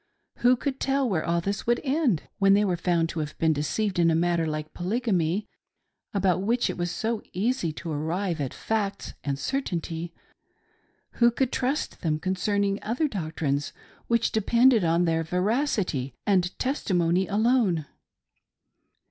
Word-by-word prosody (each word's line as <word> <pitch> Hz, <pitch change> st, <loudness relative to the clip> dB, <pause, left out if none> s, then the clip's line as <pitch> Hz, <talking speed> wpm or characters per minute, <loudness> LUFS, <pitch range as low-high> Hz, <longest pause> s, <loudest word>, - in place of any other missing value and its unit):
Who 250 Hz, +1 st, +4 dB
could 270 Hz, +1 st, -3 dB
tell 275 Hz, -1 st, +1 dB
where 180 Hz, -8 st, 0 dB
all 170 Hz, 0 st, 0 dB
this 200 Hz, +5 st, -3 dB
would 240 Hz, 0 st, +3 dB
end? 270 Hz, -, +1 dB, 0.2 s
When 195 Hz, 0 st, +5 dB
they 205 Hz, +1 st, +3 dB
were 185 Hz, -3 st, +1 dB
found 170 Hz, -1 st, +1 dB
to 165 Hz, -, -4 dB
have 150 Hz, -1 st, -4 dB
been 160 Hz, -1 st, +3 dB
deceived 180 Hz, +6 st, -1 dB
in 170 Hz, -1 st, +5 dB
a 160 Hz, -, +3 dB
matter 170 Hz, -1 st, +1 dB
like 155 Hz, 0 st, -4 dB
Polygamy, 190 Hz, -2 st, 0 dB, 0.6 s
about 190 Hz, -3 st, +1 dB
which 235 Hz, +5 st, +1 dB
it -, -, -7 dB
was 175 Hz, 0 st, 0 dB
so 220 Hz, +4 st, -2 dB
easy 200 Hz, -2 st, 0 dB
to 165 Hz, +1 st, -6 dB
arrive 165 Hz, +3 st, -2 dB
at 135 Hz, -, -2 dB
facts 200 Hz, -3 st, -3 dB
and 140 Hz, -1 st, -1 dB
certainty, 170 Hz, -, -3 dB, 1.1 s
who 235 Hz, 0 st, +6 dB
would 265 Hz, -2 st, +2 dB
trust 265 Hz, +4 st, -2 dB
them 155 Hz, -4 st, 0 dB
concerning 195 Hz, +3 st, 0 dB
other 245 Hz, +9 st, 0 dB
doctrines 155 Hz, -, -2 dB, 0.3 s
which 235 Hz, -1 st, +2 dB
depended 235 Hz, +1 st, +4 dB
upon 170 Hz, +1 st, +2 dB
their 165 Hz, -1 st, +1 dB
veracity 180 Hz, -, 0 dB
and 185 Hz, -3 st, +1 dB
testimony 185 Hz, -, +1 dB
alone 210 Hz, -, +2 dB
190 Hz, 150 wpm, -26 LUFS, 165-230 Hz, 1.1 s, who